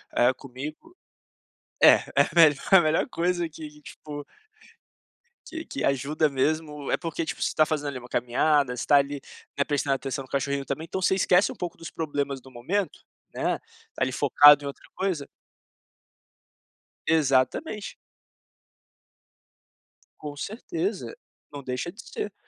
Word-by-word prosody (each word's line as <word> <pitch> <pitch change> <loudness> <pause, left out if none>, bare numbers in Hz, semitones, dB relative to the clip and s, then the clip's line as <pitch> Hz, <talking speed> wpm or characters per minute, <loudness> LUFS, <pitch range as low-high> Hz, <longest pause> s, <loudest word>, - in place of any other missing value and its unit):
eh, 125 +2 +4
comigo 145 - -9 0.9
é - - +8
é - - +4
melhor 155 -4 +6
é - - +11
a - - +8
melhor 155 -1 +1
coisa 175 0 -1
que, 150 -1 -11
tipo 145 0 -9 1.2
que 325 0 -7
que 280 - -5
ajuda 145 +3 +1
mesmo. 150 +1 -1
É - - +2
porque, 165 -1 -3
tipo, - - -5
você - - +1
tá 155 - +5
fazendo 150 -1 -2
ali 140 - -5
uma 125 - -12
caminhada, 125 +2 +1
você - - -3
tá 145 - +6
ali, 140 0 0 0.4
né, 140 - +3
prestando 140 -1 0
atenção 135 0 -4
no 130 - -16
cachorrinho 140 0 -1
também, 140 +4 -4
então 185 +3 -4
você 190 - +3
esquece 185 0 +3
um - - -9
pouco 175 -2 -5
dos 165 - -8
problemas 145 -3 -3
do 130 +1 -16
momento, 175 +11 -2 0.3
né, - - -1 0.4
ali 130 0 0
focado 145 +2 +7
em - - -4
outra 140 - -8
coisa 185 -7 -2 1.8
Exatamente. 160 - +1 2.2
Com 150 -1 -7
certeza, 330 - -4 0.4
não 145 -1 -8
deixa 130 +6 -3
de 205 +6 -12
ser. 205 - -6
150 Hz, 145 wpm, -26 LUFS, 140-170 Hz, 2.2 s, é